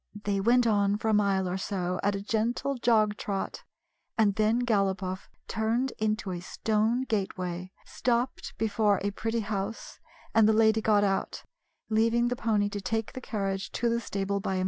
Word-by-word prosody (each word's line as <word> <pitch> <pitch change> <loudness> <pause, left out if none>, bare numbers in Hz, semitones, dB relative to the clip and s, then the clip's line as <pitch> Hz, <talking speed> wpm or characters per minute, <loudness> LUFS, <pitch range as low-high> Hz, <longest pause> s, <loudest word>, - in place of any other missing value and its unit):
They 200 -1 0
went 240 +4 +4
on 205 -2 +2
for 220 - -2
a - - +3
mile 200 -2 +2
or 180 +1 -2
so 185 -2 -2
at 200 0 +1
a 195 - -4
gentle 230 +5 0
jog 220 -4 +2
trot, 195 -2 -3 0.6
and 210 -3 +4
then 220 +4 +2
Galopoff 190 -4 0 0.2
turned 230 +4 0
into 215 -2 -1
a 175 - -3
stone 220 +6 0
gateway, 185 -5 -3
stopped 245 +1 -1
before 210 -2 +2
a 205 - 0
pretty 225 +3 -2
house, 205 +1 -4 0.3
and 220 -1 +5
the - - +5
lady 220 0 +4
got 210 -2 +3
out, 195 -1 -1 0.5
leaving 230 +2 +3
the 245 - -1
pony 215 -3 +1
to 205 0 -5
take 220 +3 -2
the 255 - -6
carriage 195 -5 -3
to 240 - 0
the 235 0 +1
stable 200 -2 -2
by 190 0 -2
himself. - - 0
215 Hz, 175 wpm, -28 LUFS, 195-225 Hz, 0.6 s, and